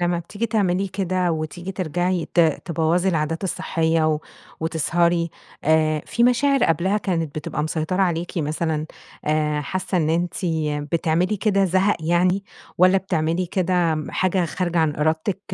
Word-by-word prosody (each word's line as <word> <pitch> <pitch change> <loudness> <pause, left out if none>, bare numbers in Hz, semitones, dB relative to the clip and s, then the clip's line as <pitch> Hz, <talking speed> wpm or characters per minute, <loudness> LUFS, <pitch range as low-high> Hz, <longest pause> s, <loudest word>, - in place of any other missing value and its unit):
لما 175 0 +1
بتييجي 200 +7 -4
تعملي 195 -3 +1
كده 185 -2 0
وتييجي 160 +4 -4
ترجعي 175 0 -1
ت 175 - +5
تبوظى 165 +2 +1
العادات 165 0 -1
الصحية 165 -3 0
و 150 - -3 0.4
وتسهري، 170 +1 +1 0.3
آآ، 155 -1 +2
في 235 - +1
مشاعر 275 +2 +3
قبلها 175 +5 +1
كانت 165 -7 -2
بتبقى 150 0 -3
مسيطرة 160 +4 -1
عليكِ 175 -2 -1
مثلًا، 155 0 -1 0.4
آآ، 150 0 +1
حاسّة 185 +6 -3
إن 155 -1 +1
أنتِ 170 +1 0 0.6
بتعملي 170 +5 +1
كده 200 -1 +2
زهق 190 +3 +2
يعني، 180 +4 +1 0.3
والاّ 185 +2 +6
بتعملي 170 -1 -1
كده 175 -2 +1
حاجة 185 -1 +1
خارجة 175 +1 -2
عن 155 -2 +1
إرادتِك، 160 +6 0
170 Hz, 140 wpm, -22 LUFS, 160-185 Hz, 0.6 s, والاّ